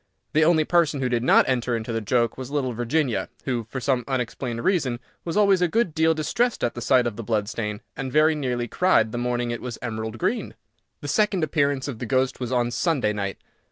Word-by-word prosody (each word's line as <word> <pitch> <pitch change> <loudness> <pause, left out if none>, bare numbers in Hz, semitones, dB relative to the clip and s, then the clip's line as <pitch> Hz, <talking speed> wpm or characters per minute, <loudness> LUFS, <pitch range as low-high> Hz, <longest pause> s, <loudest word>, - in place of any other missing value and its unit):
The 155 - +4
only 160 -1 +4
person 165 -4 +2
who 130 -1 0
did 120 -1 +1
not 125 - +5
enter 125 -2 0
into 115 +1 -4
the 115 - -1
joke 115 +1 +1
was 130 -1 -7
little 140 -4 -1
Virginia, 120 +1 0 0.2
who, 120 -4 -2
for 130 - -4
some 130 -1 0
unexplained 125 -2 -3
reason, 145 -11 +1 0.2
was 170 +3 -3
always 200 -3 +4
a 180 - +4
good 215 -1 0
deal 160 0 +3
distressed 230 +11 0
at 120 - +1
the 120 - -7
sight 125 0 +3
of 115 -3 -3
the 115 - -5
blood 105 -2 0
stain, 105 -2 -4
and 130 -1 -4
very 155 +2 +4
nearly 125 -5 -2
cried 115 -9 +2
the 120 - -3
morning 120 0 -1
it 120 - -4
was 125 -3 -5
emerald 110 -1 -4
green. 230 - -2 0.5
The - - -6
second 210 -5 +1
appearance 140 -3 0
of 125 -6 -5
the 120 - -4
ghost 130 +1 +1
was 125 -1 -4
on 120 -1 +1
Sunday 130 -5 +1
night. 100 -2 -3
130 Hz, 225 wpm, -24 LUFS, 120-155 Hz, 0.5 s, not